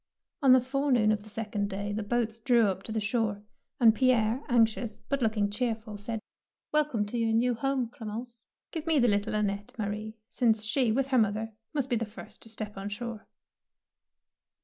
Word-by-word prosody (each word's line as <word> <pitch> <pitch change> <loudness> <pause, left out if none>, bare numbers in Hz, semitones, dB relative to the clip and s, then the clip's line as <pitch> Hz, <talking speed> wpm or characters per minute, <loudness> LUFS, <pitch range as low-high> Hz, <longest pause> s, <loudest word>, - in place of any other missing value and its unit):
On 270 -2 +6
the 260 - +7
forenoon 255 -4 +2
of 215 -1 0
the 215 - -13
second 210 -2 -2
day 205 +1 -3
the 215 - -2
boats 225 +1 -1
drew 235 -1 +4
up 190 -2 -1
to 220 - -8
the 220 - 0
shore, 210 -1 -1 0.4
and 230 -3 +7
Pierre, 240 0 +2
anxious, 225 -2 +2
but 280 -1 0
looking 215 -3 +2
cheerful, 220 -2 -2
said, 220 +2 -4 0.3
— - - -61
''Welcome 295 -8 +2
to 240 - -2
your 225 -1 +1
new 245 +2 +3
home, 265 +1 0
Clem 230 -4 -8
ence. 235 +1 -8 0.2
Q 325 - -3
ive 315 - -23
me 320 -2 +3
the 245 -3 +4
little 210 +1 +1
Annette, 205 +2 -1
Ma 215 - -1
rie, 215 +2 -4
since 225 -4 +2
she, 225 +2 +2
with 270 +4 0
her 255 - +5
mother, 220 +1 0 0.2
must 275 -3 -2
be 240 - +3
the 230 - -1
first 215 +1 -12
to 225 - -13
step 215 -2 -6
on 195 +1 -4
shore." 230 +1 -6
225 Hz, 205 wpm, -29 LUFS, 210-245 Hz, 0.4 s, the